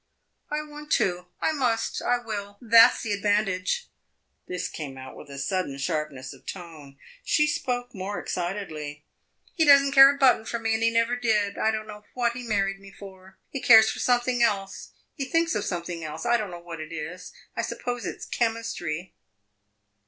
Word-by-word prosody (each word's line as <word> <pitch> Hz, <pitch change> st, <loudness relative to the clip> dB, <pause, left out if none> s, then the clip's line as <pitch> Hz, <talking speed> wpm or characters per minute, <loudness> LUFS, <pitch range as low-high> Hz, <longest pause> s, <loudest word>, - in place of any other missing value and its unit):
"I 300 Hz, +1 st, -2 dB
want 300 Hz, 0 st, -11 dB
to 180 Hz, -1 st, +1 dB, 0.2 s
I -, -, +3 dB
must 250 Hz, -7 st, -1 dB
I 245 Hz, -, +2 dB
will! 205 Hz, -4 st, -6 dB
That 230 Hz, -1 st, +7 dB
's -, -, -7 dB
the 220 Hz, -, -3 dB
advantage!" 205 Hz, -, 0 dB, 0.6 s
This 180 Hz, -1 st, -3 dB
came 140 Hz, -4 st, -7 dB
out 130 Hz, 0 st, -9 dB
with -, -, -12 dB
a 140 Hz, -, -8 dB
sudden 140 Hz, 0 st, -2 dB
sharpness 140 Hz, -1 st, -3 dB
of 135 Hz, -, -18 dB
tone; 155 Hz, -7 st, -9 dB, 0.3 s
she 300 Hz, -, +3 dB
spoke 245 Hz, -4 st, -2 dB
more 200 Hz, 0 st, -4 dB
excitedly. 155 Hz, -5 st, -5 dB, 0.5 s
"He 325 Hz, -, +2 dB
does 280 Hz, -2 st, +8 dB
n't 275 Hz, 0 st, -1 dB
care 270 Hz, 0 st, +10 dB
a 280 Hz, -, 0 dB
button 265 Hz, -5 st, +4 dB
for 235 Hz, -, -3 dB
me, 225 Hz, -1 st, -1 dB
and 220 Hz, -, 0 dB
he 230 Hz, -, +4 dB
never 230 Hz, +1 st, +1 dB
did! 215 Hz, -4 st, +1 dB
I 220 Hz, -, +1 dB
don't 215 Hz, -1 st, -2 dB
know 210 Hz, -1 st, -10 dB
what 240 Hz, -2 st, +1 dB
he 250 Hz, -, -6 dB
married 195 Hz, -4 st, -1 dB
me 195 Hz, 0 st, -13 dB
for. 190 Hz, -1 st, -13 dB
He 275 Hz, -, -4 dB
cares 220 Hz, -2 st, +7 dB
for -, -, -7 dB
something 245 Hz, 0 st, +1 dB
else 200 Hz, -4 st, 0 dB, 0.2 s
he 275 Hz, -, -4 dB
thinks 330 Hz, +5 st, +1 dB
of -, -, -1 dB
something 170 Hz, -2 st, -4 dB
else. 155 Hz, +4 st, -6 dB
I 240 Hz, 0 st, +4 dB
don't 215 Hz, -4 st, -1 dB
know 175 Hz, -, -7 dB
what 170 Hz, -2 st, -8 dB
it 155 Hz, +1 st, -8 dB
is 165 Hz, +3 st, -7 dB, 0.2 s
I -, -, -1 dB
suppose 245 Hz, -1 st, -4 dB
it -, -, -5 dB
's -, -, -5 dB
chemistry!" 225 Hz, -8 st, -2 dB
210 Hz, 195 wpm, -26 LUFS, 175-245 Hz, 0.6 s, care